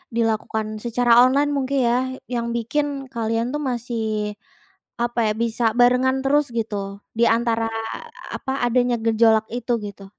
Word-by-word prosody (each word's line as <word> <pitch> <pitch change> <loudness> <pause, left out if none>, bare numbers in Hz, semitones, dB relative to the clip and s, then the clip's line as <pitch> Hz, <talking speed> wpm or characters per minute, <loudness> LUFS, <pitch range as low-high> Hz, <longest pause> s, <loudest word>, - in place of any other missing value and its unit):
dilakukan 220 -1 -1
secara 240 0 +1
online 280 +3 +3
mungkin 275 0 0
ya 240 - +3 0.4
yang 235 -1 -1
bikin 280 +3 -2
kalian 230 0 -1
tuh 295 - -2
masih, 235 -1 -3 1.0
apa 240 0 -1
ya - - -1
bisa 235 +1 -2 0.2
barengan 250 +2 +4
terus 290 +2 +3
gitu 200 -3 -3 0.2
di 235 - +4
antara 230 -1 0 0.7
apa 265 - -4
adanya 245 0 +2
gejolak 220 -1 +4
itu 245 0 -4
gitu? 200 -1 -9
235 Hz, 135 wpm, -22 LUFS, 225-255 Hz, 1.0 s, barengan